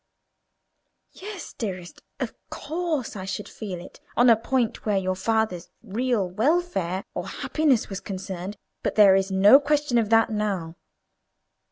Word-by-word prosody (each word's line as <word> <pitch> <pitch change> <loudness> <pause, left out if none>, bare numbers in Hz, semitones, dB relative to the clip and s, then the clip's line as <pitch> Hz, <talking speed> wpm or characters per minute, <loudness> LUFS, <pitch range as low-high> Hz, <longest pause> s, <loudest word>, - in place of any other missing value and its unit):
"Yes, 400 -1 -8
dearest, 185 -6 -6 0.2
of - - -3 0.2
course 315 -6 -3
I 190 -2 -5
should 200 +1 -4
feel 195 -5 -6
it 175 - -12 0.2
on 245 0 +7
a - - +7
point 235 +1 -1
where 210 -2 +1
your 185 -1 0
father's 215 -3 -1
real 230 -1 0
welfare 200 - 0
or - - -4
happiness 290 -7 +1
was 195 -1 -5
concerned; 190 0 -6 0.2
but - - -2
there 205 -3 +7
is 195 0 +2
no 200 +7 +7
question 290 -4 +1
of 220 -2 0
that 225 0 +4
now. 195 -6 -2
210 Hz, 145 wpm, -25 LUFS, 190-255 Hz, 0.2 s, on